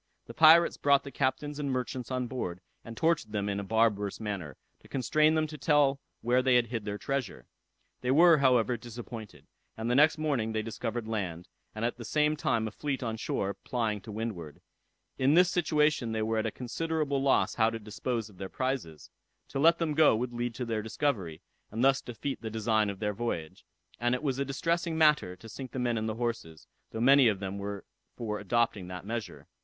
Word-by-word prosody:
The - - -10
pirates 165 +2 +6
brought 140 -1 +3
the 140 - -8
captains 145 +3 -1
and 145 -1 -2
merchants 125 -1 -3
on 130 -1 -1
board, 115 -8 -4 0.2
and 115 -1 -9
tortured 160 -10 +1
them 100 -1 -1
in 100 0 -1
a - - -4
barbarous 105 -1 +1
manner, 95 -10 -5 0.2
to - - -18
constrain 155 +4 +2
them 155 0 +2
to 150 -1 -8
tell 140 -2 +3 0.2
where 125 +2 +3
they 130 -1 +3
had 120 -1 +4
hid 115 -2 -5
their 105 0 -3
treasure. 135 -3 -3 0.6
They 125 - -2
were, 165 +3 +6
however, 125 -3 +3
disappointed; 115 -1 -9 0.3
and 115 +2 -2
the - - +2
next 150 +3 +5
morning 135 -8 -1
they 110 0 -1
discovered 115 +1 -4
land, 90 -6 -4 0.3
and 110 +1 -2
at 120 - -2
the 120 - -8
same 150 +5 +1
time 115 -6 0
a - - -5
fleet 140 +3 -3
on 115 -2 -2
shore 100 -3 -2
plying 110 0 -2
to 110 - -9
windward. 105 -8 -5 0.6
In 135 +4 +4
this 180 +1 +5
situation 150 -8 +1
they 110 -1 -1
were 110 0 0
at 110 - 0
a - - -2
considerable 145 +3 -2
loss 135 0 +2
how 110 -1 +3
to 115 - -4
dispose 110 +1 -4
of 100 -4 -18
their 95 -1 -5
prizes. 130 - -4 0.4
To 135 - -3
let 165 +3 +5
them 165 -3 -1
go 155 -5 +5
would 120 +2 -3
lead 120 -1 -3
to 125 - -3
their 115 -2 -2
discovery, 105 - -2 0.3
and 115 +3 -2
thus 135 0 +4
defeat 125 +4 -5
the 115 - -4
design 110 -1 +1
of 100 - -5
their 105 +1 -2
voyage; 95 -8 -4 0.3
and 120 +2 +2
it 125 - -6
was 135 -3 -1
a 140 - 0
distressing 165 +4 -1
matter 150 - +3
to 100 +5 -13
sink 125 +3 -8
the - - -5
men 120 -2 0
and 110 0 -1
the 110 - -3
horses, 115 -10 -4 0.2
though 110 - -5
many 135 +1 +6
of 105 -4 +1
them 95 0 -4
were 100 0 -5 0.3
for 105 -3 -3
adopting 105 -3 0
that 90 0 -7
measure. 115 +1 -5
120 Hz, 210 wpm, -29 LUFS, 110-140 Hz, 0.6 s, pirates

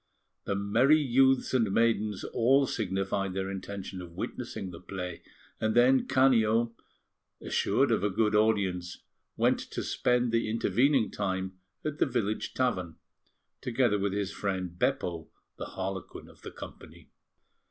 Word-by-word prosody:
The 100 - -1
merry 115 +9 +4
youths 135 -2 +3
and 115 -6 +2
maidens 110 -2 +1
all 135 +4 +3
signified 95 -3 -2
their 95 0 -2
intention 95 -1 -6
of 85 -1 -10
witnessing 95 - -5
the 85 - -10
play, 90 -1 -6 0.4
and 110 0 0
then 130 +2 +5
Canio, 115 -3 +3 0.6
assured - - +1
of - - +1
a 105 - +2
good 105 +2 +1
audience, 100 -5 +1 0.3
went - - +3
to - - -5
spend 125 -1 +1
the 115 -1 +1
intervening 120 +2 +2
time 95 0 -3 0.3
at 150 -1 -3
the - - +3
village 110 -4 -2
tavern, 95 -10 -1 0.7
together 120 -4 +1
with 100 0 -1
his 100 -1 -2
friend 95 -4 -3
Beppo, 85 -3 -1 0.3
the - - -4
Harlequin 95 0 -5
of - - -18
the - - -7
company. - - -12
105 Hz, 140 wpm, -29 LUFS, 95-120 Hz, 0.7 s, then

